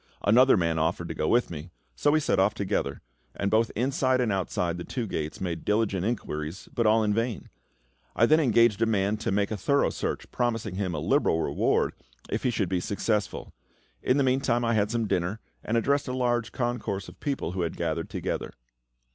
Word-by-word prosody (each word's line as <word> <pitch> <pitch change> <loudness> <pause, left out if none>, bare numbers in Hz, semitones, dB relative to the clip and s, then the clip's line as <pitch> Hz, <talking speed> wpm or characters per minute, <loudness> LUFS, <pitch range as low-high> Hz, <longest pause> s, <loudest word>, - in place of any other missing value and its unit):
Another 125 +4 +6
man 85 -2 +1
offered 85 +2 -1
to - - -3
go 75 - -1
with 120 -4 +2
me, 80 +2 -7 0.3
so 65 - +2
we 155 +1 +4
set 145 - +1
off 100 +3 +3
together, 95 -9 -2 0.3
and 100 0 -1
both 110 +1 +3
inside 130 +2 +1
and 120 -4 +1
outside 90 -2 -1
the - - -4
two 120 +4 -3
gates 80 -6 -4
made 85 -3 -3
diligent 105 -3 +1
inquiries, 90 -6 -3
but 115 -2 +1
all 110 +1 +4
in 105 -1 +1
vain. 115 0 -2 0.7
I 115 - +5
then 155 +6 +5
engaged 115 -6 +3
a 115 - +4
man 105 -1 +1
to 110 - -2
make 100 +1 +1
a 110 - -2
thorough 140 +8 +2
search, - - -4
promising 115 -5 -1
him 95 -3 -2
a - - -2
liberal 80 - +2
reward - - +1 0.4
if - - -1
he - - +1
should 105 -5 0
be 90 0 0
successful. 105 +3 -2 0.5
In 125 - +2
the 140 - +3
meantime 130 -2 +1
I 115 - +2
had 105 -2 +2
some 115 0 0
dinner, 90 +2 -1 0.2
and 115 - 0
addressed 140 +5 +1
a 125 - -2
large 120 -2 0
concourse 120 -6 -2
of - - -13
people 140 - -2
who 90 0 -3
had 85 -2 -2
gathered - - -2
together. - - -3
110 Hz, 205 wpm, -27 LUFS, 95-120 Hz, 0.7 s, Another